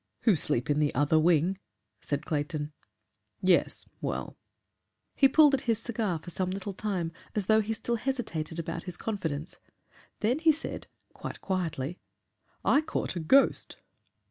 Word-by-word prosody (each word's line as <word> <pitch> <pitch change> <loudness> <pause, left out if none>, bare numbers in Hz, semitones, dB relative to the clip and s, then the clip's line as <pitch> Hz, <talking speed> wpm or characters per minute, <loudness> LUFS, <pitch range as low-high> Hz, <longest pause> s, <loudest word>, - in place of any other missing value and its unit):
"Who 220 - +5
sleep 125 -5 +1
in 145 - +2
the 150 -1 +1
other 145 +3 +4
wing," 175 +3 +3 0.4
said 145 +1 -3
Clayton. 150 0 -2 0.7
"Yes. 185 -2 +2 0.2
Well - - -3 0.4
" 95 +2 -52
He 270 - +9
pulled 295 +1 +6
at 270 - +2
his 225 - +4
cigar 215 -6 -2
for 170 +3 -10
some 185 +1 -1
little 195 +1 -4
time 185 -5 -2 0.2
as 205 -3 0
though 220 +2 +5
he 215 +1 -3
still 235 +2 -1
hesitated 215 - -3
about 165 0 -4
his 180 -2 -6
confidence. 165 -7 -3 0.6
Then 240 +7 +2
he 325 0 +6
said, 315 +1 -5 0.3
quite - - -7
quietly, 175 -4 -2 0.7
"I 285 - +5
caught 310 - -3
a - - -1
ghost!" 265 - +3
180 Hz, 155 wpm, -29 LUFS, 155-220 Hz, 0.7 s, He